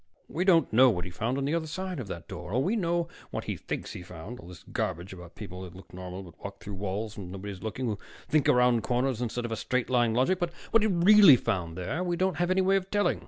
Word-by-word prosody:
We 180 Hz, +3 st, -2 dB
don't 165 Hz, -, +4 dB
know 130 Hz, +3 st, +7 dB
what 90 Hz, -6 st, -1 dB
he 90 Hz, -, -7 dB
found 115 Hz, +8 st, -2 dB
on 140 Hz, -, -1 dB
the 145 Hz, -, 0 dB
other 165 Hz, -1 st, -1 dB
side 185 Hz, +1 st, -4 dB
of 120 Hz, -, -5 dB
that 85 Hz, -3 st, -7 dB
door. 90 Hz, 0 st, -7 dB
Oh, -, -, +3 dB
we 185 Hz, -, +1 dB
know 170 Hz, -4 st, 0 dB, 0.2 s
what -, -, -4 dB
he -, -, -3 dB
thinks -, -, -5 dB
he -, -, -7 dB
found, 90 Hz, +6 st, -9 dB
all 85 Hz, -, -12 dB
this 90 Hz, -2 st, -12 dB
garbage 90 Hz, +4 st, -3 dB
about 90 Hz, -2 st, -11 dB
people 95 Hz, -4 st, -8 dB
that 90 Hz, -1 st, -9 dB
look 95 Hz, -, -14 dB
normal 90 Hz, +1 st, -7 dB
but 85 Hz, -3 st, -15 dB
walk 100 Hz, 0 st, -7 dB
through 105 Hz, -, -7 dB
walls 100 Hz, +3 st, -4 dB
when 90 Hz, -3 st, -7 dB
nobody's 100 Hz, 0 st, -7 dB
looking, 110 Hz, +4 st, -3 dB
who 105 Hz, -4 st, -2 dB, 0.3 s
think 155 Hz, -3 st, +3 dB
around 125 Hz, -2 st, +4 dB
corners 125 Hz, 0 st, 0 dB
instead 120 Hz, 0 st, -2 dB
of 120 Hz, -, -5 dB
in 110 Hz, -, -2 dB
straight 125 Hz, +3 st, -1 dB
line 120 Hz, -3 st, +3 dB
logic. 155 Hz, +10 st, +2 dB
But 175 Hz, -1 st, -1 dB, 0.2 s
what 230 Hz, -, +5 dB
he 215 Hz, -, +3 dB
really 195 Hz, -3 st, +8 dB
found 85 Hz, -7 st, -2 dB
there, 125 Hz, -, -2 dB
we 175 Hz, -1 st, 0 dB
don't 185 Hz, -3 st, +1 dB
have 175 Hz, +1 st, +1 dB
any 185 Hz, +1 st, +3 dB
way 195 Hz, +1 st, +4 dB
of 190 Hz, 0 st, -4 dB
telling. 205 Hz, 0 st, +1 dB
120 Hz, 265 wpm, -28 LUFS, -, 0.3 s, really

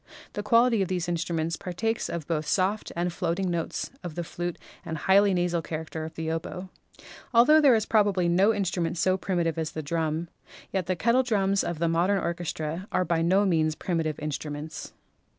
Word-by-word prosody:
The 205 Hz, -, -3 dB
quality 230 Hz, +1 st, +4 dB
of 190 Hz, -, +1 dB
these 180 Hz, -2 st, -1 dB
instru 170 Hz, -1 st, -2 dB
ments 165 Hz, +1 st, -1 dB
partakes 190 Hz, +8 st, -2 dB
of 170 Hz, -3 st, -4 dB
both 155 Hz, -1 st, -1 dB
the -, -, -4 dB
soft 200 Hz, +3 st, 0 dB, 0.2 s
floating 175 Hz, +1 st, -1 dB
notes 170 Hz, -1 st, -3 dB
of 170 Hz, -3 st, -6 dB
the 175 Hz, -, -2 dB
flute 175 Hz, +1 st, -4 dB, 0.3 s
and 160 Hz, -, -4 dB
the -, -, -8 dB
highly 200 Hz, +1 st, +5 dB
nasal 175 Hz, -2 st, +1 dB
character 160 Hz, 0 st, -5 dB
of 160 Hz, -, -9 dB
the 160 Hz, 0 st, -3 dB
oboe. 180 Hz, +3 st, -5 dB, 0.6 s
Altho 300 Hz, +7 st, +7 dB
there 275 Hz, -5 st, +6 dB
is 220 Hz, -1 st, +1 dB
probably 200 Hz, -5 st, +2 dB
no 190 Hz, +5 st, +4 dB
instrument 180 Hz, -5 st, -1 dB
so 185 Hz, +3 st, +2 dB
primitive 175 Hz, -4 st, -1 dB
as 155 Hz, -1 st, -3 dB
the 155 Hz, -, -4 dB
drum, 160 Hz, +2 st, -1 dB, 0.5 s
yet 190 Hz, -3 st, -1 dB
the 185 Hz, -, +1 dB
kettle 235 Hz, +7 st, +3 dB
drums 200 Hz, -5 st, +1 dB
of 170 Hz, -, -3 dB
the 170 Hz, +2 st, +1 dB
modern 175 Hz, +5 st, +2 dB
orchestra 170 Hz, 0 st, -3 dB
are 185 Hz, -, +1 dB
by 165 Hz, -1 st, +1 dB
no 190 Hz, +5 st, +3 dB
means 160 Hz, -4 st, +2 dB
primitive 160 Hz, -3 st, -2 dB
instruments. 150 Hz, +1 st, -5 dB
175 Hz, 190 wpm, -27 LUFS, 160-195 Hz, 0.6 s, Altho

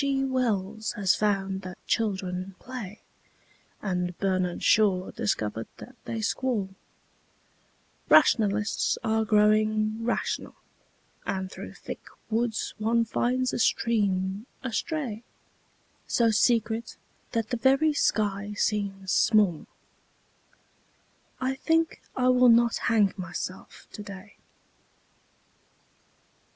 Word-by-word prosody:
G. 275 Hz, -1 st, +1 dB
Wells 220 Hz, -5 st, -1 dB
has 200 Hz, -5 st, +2 dB
found 195 Hz, -2 st, 0 dB
that 185 Hz, -1 st, -8 dB
children 190 Hz, -3 st, -2 dB
play, 230 Hz, -5 st, -8 dB, 0.8 s
And 180 Hz, -3 st, -2 dB
Bernard 185 Hz, -2 st, -1 dB
Shaw 195 Hz, -4 st, +3 dB
discovered 115 Hz, -, -2 dB
that 250 Hz, -, -12 dB
they 225 Hz, -1 st, -3 dB
squall; 220 Hz, -3 st, -1 dB, 1.4 s
Rationalists 210 Hz, -1 st, +4 dB
are 220 Hz, 0 st, +1 dB
growing 215 Hz, +1 st, +2 dB
rational 240 Hz, -, -2 dB, 0.7 s
And 190 Hz, 0 st, -3 dB
through -, -, -8 dB
thick -, -, -8 dB, 0.3 s
woods 225 Hz, 0 st, -1 dB
one 230 Hz, +2 st, +2 dB
finds 250 Hz, +3 st, 0 dB
a -, -, -2 dB
stream 200 Hz, -3 st, +1 dB, 0.2 s
astray, 260 Hz, -2 st, -3 dB, 0.9 s
So 230 Hz, -2 st, +3 dB
secret 225 Hz, 0 st, +1 dB, 0.4 s
that 230 Hz, -2 st, -1 dB
the 245 Hz, -, 0 dB
very 270 Hz, +6 st, +3 dB
sky 205 Hz, -6 st, 0 dB
seems 195 Hz, -3 st, -1 dB
small 210 Hz, -8 st, +3 dB, 1.7 s
I 260 Hz, 0 st, 0 dB
think 325 Hz, +4 st, 0 dB
I 255 Hz, 0 st, +2 dB
will 250 Hz, -1 st, +6 dB
not 235 Hz, 0 st, +5 dB
hang 210 Hz, -4 st, +3 dB
myself 185 Hz, 0 st, -7 dB
today. 205 Hz, 0 st, -10 dB
215 Hz, 95 wpm, -27 LUFS, 195-235 Hz, 1.7 s, will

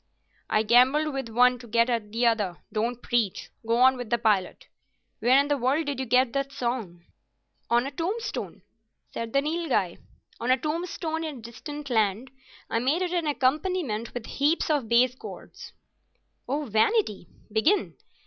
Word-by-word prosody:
"I 215 Hz, -, +2 dB
gambled 260 Hz, +7 st, +4 dB
with 270 Hz, -3 st, -4 dB
one 250 Hz, +2 st, +4 dB
to 240 Hz, -, -12 dB
get 230 Hz, +1 st, +3 dB
at 230 Hz, -4 st, -2 dB
the 235 Hz, +2 st, 0 dB
other. 210 Hz, -7 st, +1 dB, 0.2 s
Don't 235 Hz, +3 st, -2 dB
preach. 230 Hz, -6 st, -1 dB
Go 230 Hz, +1 st, +1 dB
on 260 Hz, +1 st, +5 dB
with 245 Hz, -3 st, -6 dB
the 235 Hz, -, +2 dB
"Pilot." 210 Hz, -5 st, 0 dB, 0.5 s
Where 250 Hz, +4 st, +5 dB
in 280 Hz, -, +2 dB
the 290 Hz, -1 st, 0 dB
world 275 Hz, +6 st, +1 dB
did 285 Hz, -2 st, -3 dB
you 265 Hz, -, -3 dB
get 250 Hz, 0 st, +3 dB
that 275 Hz, 0 st, -1 dB
song?" 230 Hz, -10 st, -4 dB, 0.7 s
"On 240 Hz, +1 st, +3 dB
a 275 Hz, -, -4 dB
tombstone," 380 Hz, -, -4 dB, 0.5 s
said 230 Hz, -1 st, -4 dB
the 275 Hz, +2 st, +2 dB
Nilghai. 300 Hz, -, -1 dB, 0.4 s
"On 235 Hz, -, -3 dB
a 255 Hz, -, +5 dB
tombstone 320 Hz, +2 st, -3 dB
in 310 Hz, -4 st, -5 dB
a -, -, -11 dB
distant 280 Hz, +5 st, -8 dB
land. 220 Hz, +2 st, +1 dB, 0.4 s
I 230 Hz, -, 0 dB
made 285 Hz, +9 st, +1 dB
it 360 Hz, -1 st, -2 dB
an 340 Hz, -3 st, 0 dB
accompaniment 280 Hz, -, -1 dB
with 240 Hz, -2 st, -5 dB
heaps 305 Hz, +3 st, +1 dB
of 275 Hz, -7 st, 0 dB
base 245 Hz, +1 st, +4 dB
chords." 255 Hz, -, -10 dB, 0.8 s
"Oh, 290 Hz, +3 st, -1 dB
Vanity! 220 Hz, -, +1 dB, 0.2 s
Begin." 295 Hz, -, +2 dB
250 Hz, 165 wpm, -26 LUFS, 230-295 Hz, 0.8 s, on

